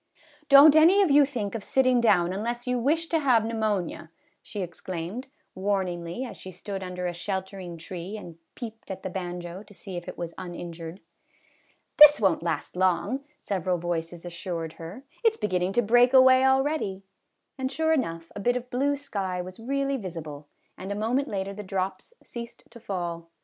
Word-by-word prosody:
" 300 -1 -28
Don't 285 +2 +9
any 350 +6 +7
of 350 - +2
you 285 0 +7
think 235 -8 -4
of 225 -3 -4
sitting 255 -2 +3
down 185 -6 +3
unless 235 +4 -3
you 250 -1 0
wish 310 +7 +1
to 325 - +2
have 250 -7 +3
pneumonia," 215 -8 -2 0.3
she 205 -3 -5
exclaimed, 180 +7 -6 0.3
warn 195 0 0
ingly, 175 +7 -5
as - - -10
she 190 - -9
stood 195 +2 -6
under 180 -1 -5
a 175 - -1
sheltering 190 -1 -5
tree 180 +5 -6
and 170 -5 -10 0.2
peeped 225 -2 -8
at 190 - -6
the 185 - -4
banjo 175 0 -5
to 205 - -16
see 190 -2 -7
if 175 - -7
it - - -7
was 170 -1 -5
injured. 175 -1 -7 0.5
" - - -38
This 295 0 +10
won't 190 -6 +2
last 170 0 -3
long, 185 +9 +1
" 300 - -40
several 185 -2 -1
voices 170 0 -4
assured 170 -2 -5
her; 175 +11 -9
" - - -31
it 450 -1 +4
's - - -15
beginning 185 -2 0
to 240 - +3
break 245 +4 +5
away 260 0 +7
already," 265 -7 +1 0.6
and 260 0 -1
sure 320 +3 +1
enough, 165 - -2
a - - -5
bit 245 +5 +1
of 250 0 -5
blue 280 +3 +1
sky 200 -10 -3
was 185 +2 -7
really 275 +3 -1
visible, 155 - -7 0.3
and 190 +2 -6
a - - -1
moment 240 +7 0
later 195 -3 -3
the 210 - -7
drops 190 - -3
ceased 235 -1 -9
to 235 - -12
fall. 175 -5 -4
200 Hz, 190 wpm, -27 LUFS, 175-255 Hz, 0.6 s, This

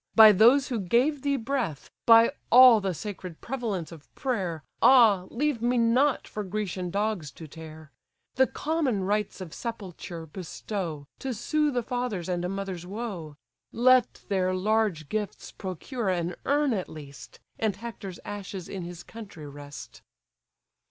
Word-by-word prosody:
by 220 -1 +10
those 240 +8 +5
who 240 -4 -1
gave 250 - +2
thee 280 0 +1
breath! 235 - -3 0.2
By 230 +1 +8 0.2
all 245 -3 +9
the 190 -3 -2
sacred 185 -4 -7
prevalence 220 - -4
of 160 -3 -13
prayer; 190 - -2 0.2
Ah, 220 -8 +6
leave 280 -1 -1
me 245 +1 +1
not 250 +4 +2
for 210 - -5
Grecian 190 -2 -3
dogs 200 -4 -1
to 160 - -10
tear! 155 -1 -11 0.4
The 265 +1 +4
common 285 -10 -1
rites 205 0 -1
of 175 -4 -7
sepulture 185 -7 -6
bestow, 170 -2 -5
To 265 -2 -3
soothe 295 +4 0
a 245 - +1
father's 245 -8 -3
and 175 -1 -1
a 180 - -2
mother's 190 -3 -5
woe: 190 -8 -6 0.4
Let 255 +1 +3
their 185 -2 +1
large 200 -5 +1
gifts 210 +2 -4
procure 195 - -4
an 175 -1 -1
urn 285 -2 +2
at 190 -4 -3
least, 145 -3 -11 0.2
And 215 -3 0
Hector's 205 -4 -8
ashes 195 -3 -6
in 190 - -6
his 175 0 -8
country 200 -9 -10
rest." 145 0 -10
205 Hz, 150 wpm, -27 LUFS, 175-240 Hz, 0.4 s, by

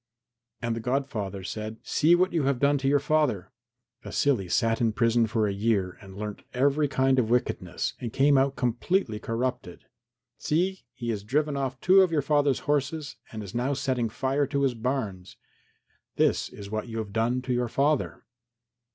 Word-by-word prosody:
And 115 -1 0
the - - -3
godfather 110 -6 -2
said, 110 +3 -5
"See 165 +3 +4
what 185 +1 +1
you 160 -5 +1
have 140 -1 +1
done 140 +1 +3
to 135 - -1
your 145 +1 +4
father. 140 - 0 0.5
Vasily 120 -11 0
sat 115 +5 +1
in 115 -2 +2
prison 115 0 +2
for 110 -1 +1
a 100 - -1
year 100 -3 0
and 95 -1 -12
learnt 105 0 -5
every 140 +3 +2
kind 135 -1 +2
of 115 -3 0
wickedness 90 -7 -1
and 120 -3 -4
came 140 +3 +4
out 135 +1 +2
completely 125 - 0
corrupted. 115 -6 -3 0.5
See, 185 +5 -1
he 120 -2 -5
has 105 -3 -4
driven 145 +6 0
off 135 -1 -3
two 190 +1 +6
of 185 -3 +3
your 150 -4 +1
father's 145 -2 +2
horses 145 +1 -1
and 110 -1 -6
is 100 - -9
now 130 +4 0
setting 130 -4 -1
fire 135 +5 0
to 140 -1 -1
his 135 -2 +2
barns. 110 -6 -3 0.8
This - - +2
is 100 0 -10
what 110 +2 -3
you 115 -1 -6
have 105 -3 -4
done 120 +3 0
to 130 - -1
your 120 0 0
father." 140 +4 0
125 Hz, 180 wpm, -27 LUFS, 110-140 Hz, 0.8 s, two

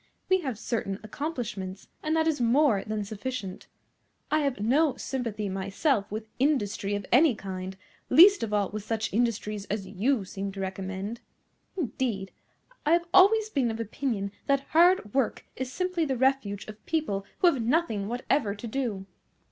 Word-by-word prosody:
We 375 0 +4
have 260 -8 -3
certain 205 -3 -3
accomplishments, 215 - -5
and 310 +1 0
that 320 0 +2
is 305 -5 +1
more 240 -3 +3
than 215 -1 -3
sufficient. 210 -2 -5 0.6
I 310 - +4
have 280 -5 -1
no 270 +7 +3
sympathy 230 -6 -3
myself 200 +4 0
with 215 +1 -5
industry 210 -8 +1
of 205 -1 -4
any 260 +1 +5
kind, 190 -1 -6 0.3
least 390 +5 +8
of 225 -2 -2
all 205 -2 +1
with 210 -1 -5
such 220 -1 -2
industries 215 -3 0
as 200 -1 -3
you 215 +3 0
seem 195 +1 -5
to 195 - -8
recommend. 195 +3 -4 0.6
Indeed, 240 - -2 0.5
I 305 - +3
have 340 0 +3
always 420 +3 +6
been 260 - +1
of 225 0 -4
opinion 220 -3 -2 0.2
that 275 -1 +3
hard 340 - +5
work 265 -4 0
is 260 -1 -4
simply 365 +1 -1
the 265 -3 -1
refuge 260 -6 +1
of 215 0 -10
people 300 -12 -1
who 350 -2 +5
have 255 - -3
nothing 230 -5 +1
whatever 240 -2 0
to 205 - -8
do." 220 -6 -2
230 Hz, 165 wpm, -28 LUFS, 200-280 Hz, 0.6 s, least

